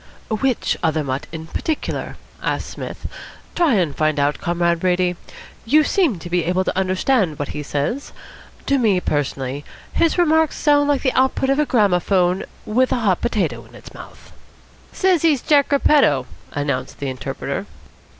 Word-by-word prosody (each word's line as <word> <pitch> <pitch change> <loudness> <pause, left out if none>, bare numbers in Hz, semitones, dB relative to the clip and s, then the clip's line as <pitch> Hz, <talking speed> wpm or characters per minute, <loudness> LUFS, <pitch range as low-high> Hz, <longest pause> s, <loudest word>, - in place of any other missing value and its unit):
"Which 240 +3 0
other 160 -2 +1
mutt 135 0 -3
in 160 -1 -7
particular?" 305 - -3 0.2
asked - - -2
Psmith. - - -7 0.5
"Try 330 -8 +3
and 170 -8 0
find 155 -1 +1
out, 145 +1 +1
Comrade 170 0 +1
Brady. 180 0 +1 0.5
You 300 +7 +4
seem 315 - +1
to 170 - -9
be 175 0 0
able 180 +2 +1
to - - -2
understand 190 - +1
what 145 - -4
he 150 - -5
says. 145 - -3 0.5
To 275 -1 +2
me, 210 -6 +3
personally, 140 -3 -2 0.3
his 335 +1 +2
remarks 320 -3 +3
sound 290 -1 +3
like 285 -2 +1
the 260 - +1
output 265 +1 +2
of 275 - +1
a 300 - +2
gramophone 185 -4 +2 0.2
with 255 +4 +1
a 250 - 0
hot 195 -5 +1
potato 170 - -1
in - - -18
its - - -13
mouth." - - -13 0.6
"Says 370 -4 +2
he's 310 -6 +2
Jack 290 -2 +3
Repetto," 275 - +4 0.3
announced 140 -3 -3
the 140 - -4
interpreter. 130 -4 -4
185 Hz, 160 wpm, -20 LUFS, -, 0.6 s, You